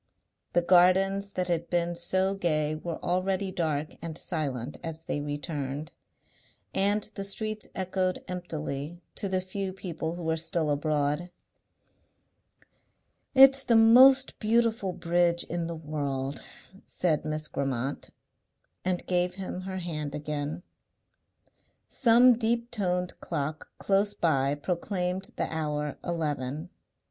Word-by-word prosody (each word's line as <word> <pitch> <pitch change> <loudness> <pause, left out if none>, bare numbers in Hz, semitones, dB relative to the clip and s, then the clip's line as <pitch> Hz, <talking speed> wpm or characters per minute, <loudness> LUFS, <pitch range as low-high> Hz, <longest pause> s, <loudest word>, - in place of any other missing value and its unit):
The 175 - +3
gardens 190 +3 +4
that 180 -1 -1
had 170 -1 -1
been 175 0 0
so 185 +3 +1
gay 155 -5 0
were 160 +1 -4
already 185 +2 0
dark 155 -4 -2
and 165 -1 -5
silent 145 -7 -3
as 160 -1 -5
they 145 -2 -3
returned, 145 0 -4 0.8
and 200 +2 +2
the 195 - -4
streets 215 +2 -3
echoed 185 0 -1
emptily 160 -3 -4
to 200 - -2
the 185 0 0
few 190 +1 -4
people 170 -3 -4
who 175 - -7
were 160 0 0
still 160 -2 0
abroad. 150 +3 0 2.1
"It's 270 0 +8
the 240 -3 +3
most 255 +4 +7
beautiful 225 -3 +2
bridge 170 0 +1
in 170 0 -3
the 170 - -4
world," 140 -3 -3 0.4
said 160 -5 0
Miss 155 0 -2
Grammont, 135 -1 -3 0.7
and 180 -1 -1
gave 180 0 +1
him 185 -1 -5
her 190 0 -5
hand 150 -5 -4
again. 150 +2 -4 1.3
Some 240 -1 +5
deep 235 +1 0
toned 180 -5 -1
clock 150 +2 -4
close 200 +1 +1
by 140 -4 +2
proclaimed 180 +3 -2
the - - -1
hour 150 -2 -2
eleven. 155 -1 -3
175 Hz, 120 wpm, -28 LUFS, 150-190 Hz, 2.1 s, It's